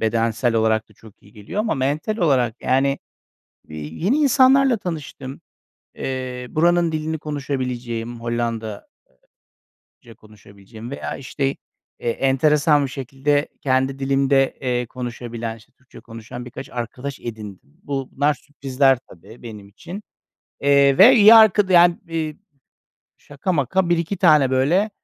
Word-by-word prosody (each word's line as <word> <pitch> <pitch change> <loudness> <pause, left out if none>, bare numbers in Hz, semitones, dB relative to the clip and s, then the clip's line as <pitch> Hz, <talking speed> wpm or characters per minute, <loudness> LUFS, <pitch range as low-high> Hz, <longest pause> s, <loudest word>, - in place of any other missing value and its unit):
bedensel 115 +1 0
olarak 110 -1 +1
da - - -21
çok 110 0 -18
iyi 100 - -20
geliyor 110 - -5
ama 220 0 -1
mental 150 +10 -2
olarak, 130 - 0
yani, 135 +2 +1 0.7
eee, 75 - -8
yeni 80 - -2
insanlarla 270 -2 +4
tanıştım. 145 -7 -7 0.5
Eee, 130 -1 -5
buranın 170 +1 +2
dilini 155 0 -3
konuşabileceğim, 125 -5 -4
Hollanda 115 -2 -3 1.3
eee, - - -21
ca 115 - -12
konuşabileceğim 105 +2 -14
veya, 140 - -5
işte, 135 +1 -3 0.4
e, 120 - -2
enteresan 145 +3 +2
bir 135 - -4
şekilde 135 +2 -1
kendi 130 0 0
dilimde, 135 0 +1
eee, 125 -2 -1
konuşabilen, 120 -2 -6
işte, 110 - -21
Türkçe 130 - -17
konuşan 115 +1 -10
birkaç 125 - -9
arkadaş 125 +3 -6
edindim. 105 -5 -8 0.2
Bu, 135 -2 -4
bunlar 145 +2 +1
sürprizler 135 -1 0
tabii 100 +7 -15
benim 105 -4 -10
için. 175 - -10 0.6
Eee, 140 -1 +4
ve 240 +7 +8
iyi 215 0 +8
arkada 205 -3 +5
yani, 175 0 +6
eee, 160 -2 -4 0.8
şaka 145 +7 -4
maka 170 +4 0
1-2 170 +3 0
tane, 155 -7 +4
böyle, 165 +11 +2
135 Hz, 130 wpm, -21 LUFS, 120-155 Hz, 1.3 s, ve